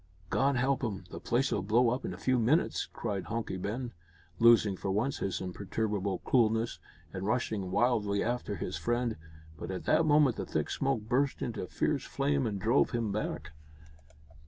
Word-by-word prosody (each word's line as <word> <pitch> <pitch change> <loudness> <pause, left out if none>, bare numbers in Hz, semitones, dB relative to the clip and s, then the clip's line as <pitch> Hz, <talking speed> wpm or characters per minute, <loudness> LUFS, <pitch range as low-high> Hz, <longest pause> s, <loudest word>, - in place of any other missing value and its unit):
"God 140 +1 +2
help 130 +1 +1
him! 100 -6 -3
the - - -6
place'll 120 -4 0
blow 115 +5 +3
up 125 +2 -2
in - - -3
a - - -7
few 130 -1 +1
minutes," 130 +9 +2
cried 100 -5 -4
Hunky 115 -4 -3
Ben, 115 +6 -4 0.5
losing, 115 -4 +6
for 95 - -4
once, 110 +8 0
his 95 - -2
imperturbable 100 +1 -2
coolness, 115 -2 +2 0.3
and 95 - -4
rushing 110 -4 -1
wildly 105 -1 +1
after 120 -3 -2
his 90 - -4
friend. 120 -1 0 0.4
But - - -6
at 95 -1 -4
that 160 - +3
moment 145 -5 +4
the - - -3
thick - - -2
smoke 135 -4 0
burst 130 +6 0
into 115 -6 -4
fierce 140 +6 -1
flame 140 -2 0
and 100 -2 -3
drove 115 +8 +3
him 115 -4 -1
back. 75 -7 -3
115 Hz, 170 wpm, -31 LUFS, 100-130 Hz, 0.5 s, losing